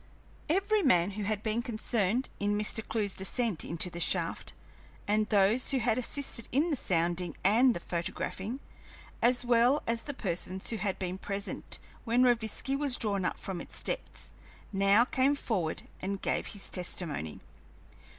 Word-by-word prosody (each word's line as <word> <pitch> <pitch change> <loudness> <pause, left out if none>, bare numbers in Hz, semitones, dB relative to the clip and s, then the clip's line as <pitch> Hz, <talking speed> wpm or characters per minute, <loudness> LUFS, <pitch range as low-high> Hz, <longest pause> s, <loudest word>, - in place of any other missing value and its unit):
Every 400 +5 +2
man 190 - +3
who 205 +1 -4
had 215 0 -2
been 220 +1 0
concerned 235 -1 0
in 205 0 +1
Mr. 215 +1 +2
Clewe's 210 -3 -1
descent 195 -1 0
into 170 +2 -1
the 170 - -6
shaft, - - -1 0.6
and 215 +1 +2
those 210 +4 +4
who 270 - +2
had 240 -1 +1
assisted 255 -2 0
in 300 +7 +2
the - - +2
sounding 175 - -1
and 235 +6 +5
the - - -3
photographing, 190 +8 -4 0.6
as 245 +1 +3
well 245 +4 +4
as 230 0 0
the 285 - -6
persons 185 -2 -3
who 225 - -2
had 195 -1 -2
been 185 0 -4
present 200 +1 -3 0.3
when 240 +2 +3
Rovinski 240 +2 +1
was 275 -3 +2
drawn 200 -4 0
up - - -1
from 185 -3 -5
its - - -2
depths, - - -5 0.4
now 200 +4 +5
came 270 +2 +2
forward 185 - -2 0.2
and 195 +1 -2
gave - - -1
his 205 -2 -2
testimony. 170 - -2
215 Hz, 160 wpm, -30 LUFS, 190-245 Hz, 0.6 s, and